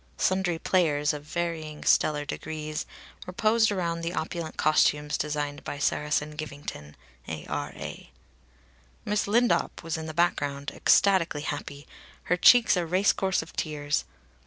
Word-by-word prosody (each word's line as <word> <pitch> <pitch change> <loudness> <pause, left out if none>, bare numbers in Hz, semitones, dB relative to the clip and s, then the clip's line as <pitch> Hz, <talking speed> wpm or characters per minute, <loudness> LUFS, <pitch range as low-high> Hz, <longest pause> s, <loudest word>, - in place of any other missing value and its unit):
Sundry 185 -3 +1
players, 155 -4 +1
of 145 -1 -6
varying 160 -2 -4
stellar 150 -1 +3
degrees, 155 0 -5 0.4
were 180 - -6
posed 220 +2 +3
around 170 -4 -1
in - - -6
the 170 +1 -3
opulent 160 0 -4
costumes 150 -1 +2
designed 145 -1 -3
by - - -5
Saracen 150 +1 0
Givington, 145 - -7 0.3
A.R.A. 80 -1 -6 1.0
Miss 210 0 0
Lindop 235 -1 +1
was 165 0 -3
in 160 0 -6
the 155 - -7
background, 145 -4 0
ecstatically 185 -7 +3
happy, 145 -1 -5 0.4
her 180 - +1
cheeks 235 +6 +6
a 180 - 0
race 185 +4 +2
course 190 0 0
of - - -15
tears. 145 -2 -1
155 Hz, 135 wpm, -27 LUFS, 150-180 Hz, 1.0 s, cheeks